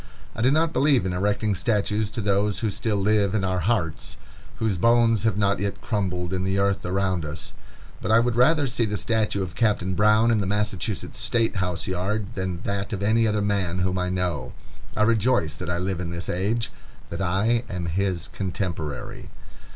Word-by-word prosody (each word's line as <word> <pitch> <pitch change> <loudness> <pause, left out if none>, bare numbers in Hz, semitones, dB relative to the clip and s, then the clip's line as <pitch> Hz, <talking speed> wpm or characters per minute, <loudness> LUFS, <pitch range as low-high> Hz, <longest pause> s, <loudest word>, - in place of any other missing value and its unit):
I 110 - -3
do 125 - +4
not 160 +3 +2
believe 140 -6 +3
in 90 - -1
erecting 105 +3 0
statues 105 +1 0
to 115 +1 -4
those 100 0 +1
who 110 -3 0
still 110 0 -1
live 100 0 +2
in 100 - +1
our 95 -1 0
hearts, 90 -4 -1 0.4
whose 105 -5 -1
bones 115 0 +4
have 110 -3 +2
not 100 -2 +1
yet 100 0 -2
crumbled 95 -5 -2
in 90 0 -1
the 95 +1 0
earth 100 -2 +1
around 95 -2 0
us, 75 0 -7 0.5
but - - -3
I 110 +1 +6
would 120 0 +1
rather 145 +5 +4
see 120 -2 0
the 105 -1 -2
statue 110 -2 0
of 90 -2 -6
Captain 100 -2 +1
Brown 105 +4 +4
in 110 - +3
the 95 - -2
Massachusetts 105 -1 -2
State 115 -3 +1
House 90 -2 -2
yard, 100 +4 -2
than 95 -4 -3
that 100 0 -3
of 100 -1 -3
any 110 +2 +3
other 105 -1 0
man 100 -4 0
whom 90 0 0
I 90 0 -1
know. 90 -8 -2 0.4
I 110 - +4
rejoice 110 -7 +2
that 90 +1 -5
I 85 - 0
live 90 0 -2
in 90 -2 -3
this 85 0 -5
age, 105 +6 -1 0.4
that 85 +3 -4
I 105 +6 +1
am 90 -3 -3
his 90 0 -1
contemporary. 90 -6 -4
100 Hz, 195 wpm, -24 LUFS, 90-110 Hz, 0.5 s, I